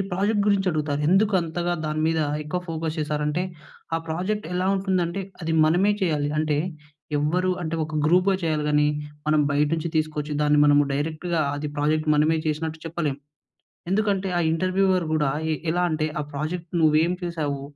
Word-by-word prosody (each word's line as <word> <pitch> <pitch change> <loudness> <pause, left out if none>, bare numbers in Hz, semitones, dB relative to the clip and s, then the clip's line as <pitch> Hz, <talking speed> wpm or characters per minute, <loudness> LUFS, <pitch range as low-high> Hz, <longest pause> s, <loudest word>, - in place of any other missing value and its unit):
Project 205 +3 +1
గురించి 200 -2 +2
అడుగుతారు. 150 -2 -1
ఎందుకు 200 +4 +3
అంతగా 170 +1 -2
దాని 155 0 -1
మీద 160 0 +1 0.2
ఎక్కువ 155 +4 -3
ఫోకస్ 160 0 -3
చేశారంటే 150 +2 -1 0.5
ఆ - - +3
ప్రాజెక్ట్ 185 +6 -2
ఎలా 180 +1 0
ఉంటుందంటే 190 -1 0 0.2
అది 160 - -1
మనమే 180 +6 +3
చేయాలి. 150 -5 +1
అంటే 155 -1 +1 0.6
ఎవరు 175 +6 +1
అంటే 160 0 -3
ఒక 155 - -7
గ్రూప్‌గా 185 +3 +4
చేయాలి 155 -2 0
కానీ 150 0 +3 0.4
మనం 155 0 +4
బయట 145 +1 +2
నుంచి 165 +1 -2
తీసుకొచ్చి 155 -1 -1
దాన్ని 150 0 +3
మనము 145 0 +5
డైరెక్ట్‌గా 160 +4 -1
అది 145 +1 -3
ప్రాజెక్ట్ 155 +1 +1
మనమే 155 +2 +3
చేసినట్టు 155 +1 -2
చెప్పలేం. 155 -4 -2 0.7
ఎందుకంటే 200 -1 +1
ఆ - - +2
ఇంటర్వ్యూవర్ 185 +1 +1
కూడా 150 -3 +2 0.2
ఎ - - +1 0.2
ఎలా 175 +2 +1
అంటే 155 -1 0
"ఆ - - 0
ప్రాజెక్ట్ 165 +4 -4
నువ్వు 155 -1 +4
ఏం 175 - 0
చేసావు? 155 -5 -3
160 Hz, 160 wpm, -24 LUFS, 150-180 Hz, 0.7 s, మనము